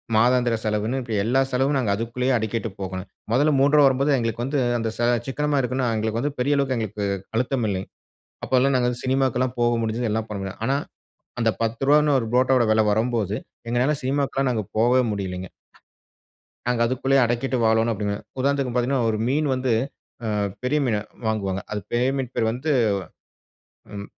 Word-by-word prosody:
மாதாந்திர 120 Hz, +1 st, +3 dB
செலவுனு 110 Hz, +4 st, -1 dB
இப்டி 115 Hz, -3 st, -4 dB
எல்லா 130 Hz, +4 st, +2 dB
செலவும் 135 Hz, +3 st, +1 dB
நாங்க 115 Hz, -6 st, 0 dB
அதுக்குள்ளேயே 125 Hz, +4 st, -1 dB
அடக்கிட்டு 110 Hz, +1 st, -2 dB
போகணும். 95 Hz, 0 st, -5 dB, 0.2 s
முதல்ல 145 Hz, +6 st, +3 dB
ரூ.3வா 145 Hz, +1 st, +5 dB
வரும்போது 135 Hz, +2 st, +2 dB
எங்களுக்கு 115 Hz, 0 st, -2 dB
வந்து 140 Hz, +1 st, 0 dB, 0.2 s
அந்த 115 Hz, 0 st, -1 dB
சா 120 Hz, -, +1 dB, 0.2 s
சிக்கனமா 145 Hz, +1 st, 0 dB
இருக்கனும்னா 125 Hz, 0 st, -1 dB
எங்களுக்கு 110 Hz, +1 st, -1 dB
வந்து 145 Hz, 0 st, -1 dB
பெரிய 145 Hz, +3 st, +2 dB
அளவுக்கு 135 Hz, -2 st, +1 dB
எங்களுக்கு 105 Hz, -2 st, -3 dB, 0.3 s
அழுத்தம் 125 Hz, 0 st, 0 dB
இல்லங்க. 95 Hz, -1 st, -3 dB, 0.6 s
அப்பலா 130 Hz, +1 st, +2 dB
நாங்க 125 Hz, -1 st, +2 dB
வந்து 120 Hz, 0 st, -3 dB
சினிமாக்கெலாம் 130 Hz, -1 st, +1 dB
போக 120 Hz, 0 st, +3 dB
முடிஞ்சுது, 115 Hz, 0 st, -1 dB
எல்லாம் 110 Hz, 0 st, -2 dB
பண்ண 100 Hz, -2 st, -4 dB
முடியும். 95 Hz, +2 st, -7 dB
ஆனா 135 Hz, +1 st, +2 dB, 0.6 s
அந்த 115 Hz, -1 st, +3 dB
ரூ.10வானு 140 Hz, +6 st, +3 dB
ஒரு 115 Hz, -, -3 dB
புரோட்டாவோட 130 Hz, -1 st, +4 dB
வில 110 Hz, 0 st, +4 dB
வரும்போது 110 Hz, -2 st, 0 dB, 0.3 s
எங்களால 125 Hz, +5 st, +2 dB
சினிமாக்கெல்லாம் 135 Hz, 0 st, 0 dB
நாங்க 110 Hz, -3 st, -1 dB
போவே 125 Hz, +3 st, +4 dB
முடியலங்க. 95 Hz, -2 st, -4 dB, 1.2 s
நாங்க 120 Hz, -1 st, +1 dB
அதுக்குள்ளையே 135 Hz, +2 st, +2 dB
அடக்கிட்டு 120 Hz, +2 st, -1 dB
வாழணும் 110 Hz, +1 st, +3 dB
அப்டிங்கிற, 100 Hz, 0 st, -2 dB, 0.2 s
உதாரணத்துக்கு 135 Hz, -2 st, 0 dB
பாத்தீங்கன்னா 125 Hz, 0 st, +1 dB
ஒரு 110 Hz, -, 0 dB
மீன் 145 Hz, +3 st, +1 dB
வந்து 130 Hz, -1 st, -1 dB, 0.5 s
ஆ -, -, -2 dB, 0.4 s
பெரிய 150 Hz, +4 st, +1 dB
மீனா 110 Hz, -4 st, +1 dB, 0.3 s
வாங்குவாங்க. 100 Hz, -3 st, -1 dB
அது 105 Hz, -, -2 dB
பெரிய 125 Hz, +2 st, +2 dB
மீன் 130 Hz, -3 st, -2 dB
பேர் 110 Hz, -1 st, +1 dB
வந்து 135 Hz, +6 st, -2 dB, 1.2 s
ம், 100 Hz, 0 st, -6 dB
120 Hz, 165 wpm, -23 LUFS, 110-135 Hz, 1.2 s, ரூ.3வா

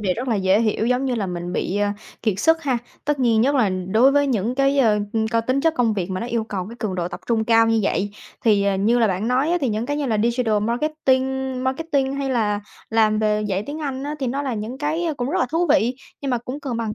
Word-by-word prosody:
việc 185 Hz, -3 st, 0 dB
rất 255 Hz, +2 st, -4 dB
là 230 Hz, -, +2 dB
dễ 190 Hz, +2 st, +3 dB
hiểu, 220 Hz, 0 st, 0 dB
giống 250 Hz, +2 st, +1 dB
như 255 Hz, -2 st, 0 dB
là, 210 Hz, -4 st, -1 dB
mình 175 Hz, 0 st, -5 dB
bị, 190 Hz, -, -2 dB
ờ, 205 Hz, 0 st, +1 dB, 0.3 s
kiệt 215 Hz, -4 st, 0 dB
sức 325 Hz, +3 st, +3 dB
ha? 260 Hz, -4 st, 0 dB, 0.3 s
Tất 295 Hz, -1 st, 0 dB
nhiên, 230 Hz, -3 st, +3 dB
nhất 275 Hz, +5 st, +2 dB
là 240 Hz, -7 st, +3 dB, 0.2 s
đối 235 Hz, +7 st, +5 dB
với 285 Hz, 0 st, +3 dB
những 235 Hz, -2 st, 0 dB
cái, 275 Hz, +1 st, +2 dB
ờ, 215 Hz, -5 st, +4 dB, 0.3 s
có 230 Hz, 0 st, +2 dB
tính 255 Hz, +4 st, 0 dB
chất 325 Hz, +2 st, +2 dB
công 230 Hz, -3 st, +1 dB
việc 190 Hz, -2 st, -3 dB
mà 185 Hz, 0 st, -3 dB
nó 235 Hz, -, -3 dB
yêu 235 Hz, -2 st, -1 dB
cầu 195 Hz, -4 st, -4 dB
cái 235 Hz, -, -10 dB
cường 205 Hz, -4 st, -2 dB
độ 175 Hz, -1 st, -2 dB
tập -, -, -8 dB
trung 225 Hz, -2 st, +1 dB
cao 225 Hz, 0 st, +4 dB
như 225 Hz, 0 st, +2 dB
vậy, 200 Hz, +1 st, 0 dB, 0.3 s
thì, 205 Hz, -3 st, +4 dB
ờ, 200 Hz, -1 st, +2 dB
như 225 Hz, +5 st, +2 dB
là 225 Hz, -, +4 dB
bạn 195 Hz, +4 st, -1 dB
nói 265 Hz, +5 st, +2 dB
á, 355 Hz, -, +2 dB
thì 265 Hz, -, 0 dB
những 220 Hz, +3 st, -2 dB
cái 290 Hz, -, -1 dB
như 290 Hz, -2 st, -1 dB
là 220 Hz, -3 st, 0 dB
digital 235 Hz, -2 st, +1 dB
marketing, 265 Hz, +1 st, 0 dB
marketing, 275 Hz, -1 st, 0 dB
hay 275 Hz, -1 st, -2 dB
là 210 Hz, -4 st, 0 dB, 0.3 s
làm 215 Hz, -1 st, +3 dB
về 215 Hz, -1 st, +1 dB
dạy 200 Hz, -1 st, -1 dB
tiếng 290 Hz, +2 st, -5 dB
Anh 270 Hz, -2 st, -3 dB
á 295 Hz, +1 st, -3 dB
thì 265 Hz, -, -2 dB
nó 275 Hz, +4 st, -2 dB
là 265 Hz, -4 st, -2 dB
những 220 Hz, +5 st, -5 dB
cái, 305 Hz, +4 st, -1 dB
ờ, 320 Hz, -3 st, -1 dB
cũng 250 Hz, +1 st, -3 dB
rất 375 Hz, -, 0 dB
là 255 Hz, -, +2 dB
thú 335 Hz, +2 st, +1 dB
vị, 260 Hz, -5 st, +2 dB, 0.2 s
nhưng 275 Hz, -2 st, -3 dB
mà 245 Hz, -, +1 dB
cũng 255 Hz, +5 st, -7 dB
cần 265 Hz, -5 st, -3 dB
bằng 225 Hz, -2 st, -3 dB
240 Hz, 280 wpm, -22 LUFS, 215-275 Hz, 0.3 s, đối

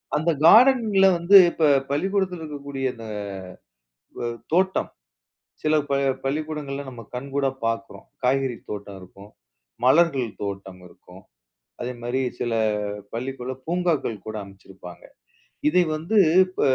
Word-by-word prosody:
அந்த 160 Hz, +3 st, 0 dB, 0.2 s
கார்டன்ல 220 Hz, -2 st, +6 dB
வந்து 175 Hz, +4 st, +4 dB, 0.2 s
இப்ப 155 Hz, -3 st, +2 dB, 0.2 s
பள்ளிக்கூடத்தில 185 Hz, +2 st, -1 dB
இருக்கக்கூடிய 140 Hz, -3 st, -6 dB
இந்த 115 Hz, -2 st, -11 dB, 1.2 s
அ -, -, -1 dB, 0.3 s
தோட்டம். 190 Hz, +2 st, +1 dB, 0.7 s
சில 155 Hz, 0 st, +2 dB
ப -, -, 0 dB, 0.3 s
பள்ளிக்கூடங்கள்ல 145 Hz, -1 st, -3 dB
நம்ம 120 Hz, -3 st, -10 dB
கண்கூடா 135 Hz, +1 st, -1 dB, 0.2 s
பார்க்குறோம். 115 Hz, +4 st, -4 dB, 0.2 s
காய்கறி 130 Hz, -1 st, +1 dB, 0.2 s
தோட்டம் 100 Hz, -1 st, -7 dB
இருக்கும். 100 Hz, +2 st, -14 dB, 0.6 s
மலர்கள் 140 Hz, -4 st, +3 dB
தோட்டம் 95 Hz, -2 st, -6 dB
இருக்கும். 90 Hz, +2 st, -17 dB, 0.6 s
அதேமாரி 120 Hz, +1 st, -3 dB, 0.2 s
சில 120 Hz, -, -1 dB, 0.6 s
பள்ளிக்குள்ள 130 Hz, +1 st, -4 dB
பூங்காக்கள் 165 Hz, -, -1 dB
கூட 110 Hz, -, -5 dB
அமச்சிருப்பாங்க. 95 Hz, -2 st, -13 dB, 0.7 s
இதை 180 Hz, +3 st, +4 dB
வந்து 165 Hz, +8 st, -3 dB, 0.3 s
இப்ப 185 Hz, -, -6 dB
140 Hz, 105 wpm, -24 LUFS, 115-170 Hz, 1.2 s, கார்டன்ல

